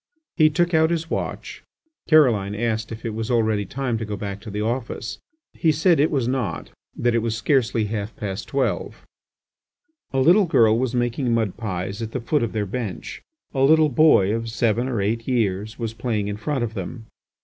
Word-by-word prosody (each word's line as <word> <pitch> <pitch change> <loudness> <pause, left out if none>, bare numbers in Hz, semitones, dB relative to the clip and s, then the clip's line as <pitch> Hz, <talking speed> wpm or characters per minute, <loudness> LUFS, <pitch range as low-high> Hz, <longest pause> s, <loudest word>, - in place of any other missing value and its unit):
He 155 -3 +5
took 175 +3 0
out 160 0 +4
his 165 -1 -2
watch. - - -4 0.5
Caroline 115 -11 +4
asked 110 0 -2
if 110 +1 -8
it 115 - -2
was 110 +2 -4
already 110 -4 +1
time 125 -2 -2
to - - -3
go 105 -1 -4
back 100 0 -5
to 105 - -9
the 105 +1 -3
office. 115 0 -3 0.3
He 160 - +2
said 160 +2 +3
it 150 - +4
was 135 -6 0
not, 125 -9 -2 0.2
that 120 0 +1
it 115 - +3
was 115 0 -2
scarcely 115 -3 +1
half 105 0 -4
past 100 -1 -5
twelve. 135 -1 -2 1.1
A 135 - 0
little 175 +9 +5
girl 115 -7 +4
was 130 -1 -1
making 120 +1 0
mud 110 -5 0
pies 100 -2 -4
at 115 0 -5
the 130 - -1
foot 125 +5 0
of 115 - -1
their 105 -2 -1
bench; 105 -2 -5 0.3
a 135 - -1
little 155 +2 +5
boy 140 - +4
of 115 0 -3
seven 115 +1 0
or 120 -6 -1
eight 115 +3 -2
years 110 -4 -1
was 115 -2 -4
playing 115 -3 -2
in 105 0 -3
front 135 +3 -2
of 115 -1 -3
them. 110 +3 -6
115 Hz, 195 wpm, -23 LUFS, 105-135 Hz, 1.1 s, He